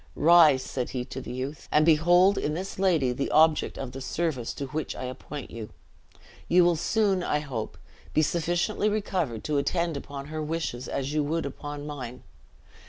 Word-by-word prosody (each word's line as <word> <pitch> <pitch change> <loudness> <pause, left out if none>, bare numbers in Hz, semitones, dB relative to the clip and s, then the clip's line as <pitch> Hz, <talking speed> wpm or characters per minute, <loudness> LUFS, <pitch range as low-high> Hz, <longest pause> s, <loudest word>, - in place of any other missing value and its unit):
"Rise," 155 -4 +6
said 125 -2 -3
he 125 -2 -3
to - - -7
the - - -7
youth, 130 +4 -5
"and 150 0 +4
behold 175 +5 +5
in 150 - -1
this 185 +2 -5
lady 165 -10 +3
the 140 +3 -2
object 155 0 +3
of 130 -2 -5
the 135 - -8
service 140 -4 -2
to 140 - -4
which 155 +3 -3
I - - -6
appoint 130 +2 -7
you. 110 -2 -7 0.8
You 175 0 +5
will 175 -1 +4
soon, 195 +2 +1
I 150 - 0
hope, 135 -7 -5 0.3
be 155 - +3
sufficiently 175 +7 0
recovered 185 - -2
to 150 -2 0
attend 170 +2 0
upon 140 0 -6
her 155 0 -4
wishes 150 -5 -3
as 140 +1 -3
you 150 -1 +1
would 165 +2 -1
upon 145 +1 -6
mine. 130 -5 -7
150 Hz, 180 wpm, -27 LUFS, 135-170 Hz, 0.8 s, Rise